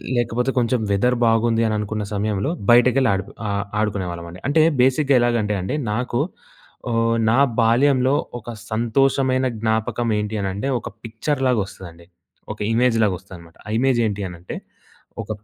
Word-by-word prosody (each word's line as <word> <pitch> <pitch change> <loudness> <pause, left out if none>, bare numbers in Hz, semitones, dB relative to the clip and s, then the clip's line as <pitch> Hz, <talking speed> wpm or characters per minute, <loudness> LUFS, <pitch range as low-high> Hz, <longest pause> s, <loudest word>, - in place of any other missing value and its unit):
లేకపోతే 120 +2 0
కొంచెం 120 +1 +1
వెదర్ 125 +5 +2
బాగుంది 115 0 +2
అని 110 - 0
అనుకున్న 105 0 -3
సమయంలో 105 +3 -1 0.2
బయటకెళ్ళి 125 +2 +5
ఆడు 95 - -1 0.2
ఆహ్, 100 0 -1
ఆడుకునే 105 -3 -1
వాళ్ళమండి. 85 +1 -8
అంటే 150 +3 +3 0.2
బేసిక్‌గా 135 +2 +3
ఎలాగంటే 115 -3 +1
అండి, 95 +10 -3 0.2
నాకు 120 +2 -1 0.7
ఆహ్, 115 0 +2
నా 120 +4 +3 0.2
బాల్యంలో 130 +3 +3 0.2
ఒక 120 - -11 0.2
సంతోషమైన 130 +3 +1
జ్ఞాపకం 110 +2 -1
ఏంటి 105 +1 -3
అని 95 - -1
అంటే, 100 +7 -3 0.4
పిక్చర్‌లాగా 130 +2 0
వస్తదండి. 85 -3 -12 0.5
ఒక - - -17
ఇమేజ్‌‌లాగా 115 -4 +2
వస్తదన్నమాట. 85 -4 -14
ఆ - - -7
ఇమేజ్ 130 -1 +2
ఏంటి 105 -1 -4
అని 90 - -10
అంటే, 90 - -7 0.7
ఒక 105 - -17
115 Hz, 145 wpm, -21 LUFS, 105-125 Hz, 0.7 s, బయటకెళ్ళి